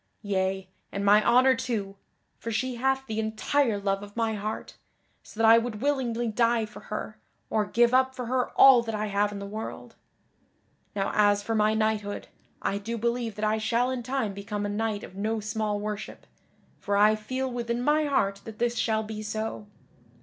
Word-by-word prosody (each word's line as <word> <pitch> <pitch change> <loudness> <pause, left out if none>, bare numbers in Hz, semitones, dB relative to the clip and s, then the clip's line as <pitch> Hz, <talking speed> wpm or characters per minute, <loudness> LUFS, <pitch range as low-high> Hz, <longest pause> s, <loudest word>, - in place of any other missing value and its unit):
Yea, 190 -1 -1 0.2
and 200 0 -3
my 205 +1 +6
honor 255 +2 +5
too! 220 -6 -3 0.4
for 230 - -5
she 255 +4 -1
hath 265 +2 +1
the 220 -3 -3
entire 220 +2 +1
love 195 0 -1
of 205 +2 -11
my 225 -1 +1
heart, 215 +1 -5 0.5
so 215 - -14
that 225 - +5
I 225 +1 +8
would 230 -2 -4
willingly 245 -3 0
die 230 0 +2
for 215 - -12
her, 215 0 -5 0.3
or 215 -2 +1
give 240 +2 +3
up 260 0 +3
for 250 - -4
her 250 +1 0
all 265 -3 +9
that 225 -2 -4
I 215 0 -1
have 205 0 +1
in 205 - -6
the 200 - -6
world. 215 +2 -7 1.0
Now 195 -1 0
as 205 -1 +3
for 225 - -2
my 215 0 +3
knighthood, 215 -2 -1 0.3
I 200 - 0
do 230 +3 -4
believe 235 -1 -1
that 215 - -2
I 215 +1 +1
shall 235 +3 +1
in 255 -1 -3
time 255 -4 -2
become 205 +1 -4
a - - -2
knight 210 0 -2
of - - -10
no 220 +3 -1
small 215 -1 -2
worship, 210 0 -6 0.5
for 200 0 0
I 210 +1 +5
feel 255 +5 -3
within 235 -1 -2
my 300 +2 +3
heart 200 -9 0
that 220 -1 -9
this 240 0 0
shall 220 -1 +1
be 215 0 -6
so. 215 0 -4
220 Hz, 195 wpm, -27 LUFS, 205-240 Hz, 1.0 s, all